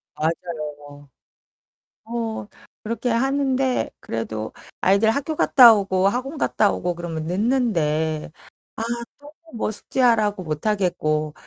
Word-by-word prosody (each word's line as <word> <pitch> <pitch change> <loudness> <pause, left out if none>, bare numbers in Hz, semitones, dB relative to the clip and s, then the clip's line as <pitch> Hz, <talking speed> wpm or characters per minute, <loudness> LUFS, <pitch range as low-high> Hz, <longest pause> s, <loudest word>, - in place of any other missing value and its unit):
맞아요. 150 -3 -5 1.0
어 225 -2 -4 0.4
그렇게 230 +3 -3
하는데 265 +1 +1
그래도 110 -1 -4 0.3
아이들 200 +4 +4
학교 285 +6 -2
갔다 245 -5 +8
오고 195 -2 +1
학원 255 +8 -3
갔다 210 -6 +2
오고 180 0 -2
그러면 165 -2 -5
늦는데 165 - 0 0.5
아 - - -4 0.4
또 290 +1 -14 0.2
뭐 220 - -1
숙제하라고 215 -3 +1
못하겠고. 155 -3 -1
200 Hz, 240 characters per minute, -22 LUFS, 155-235 Hz, 1.0 s, 갔다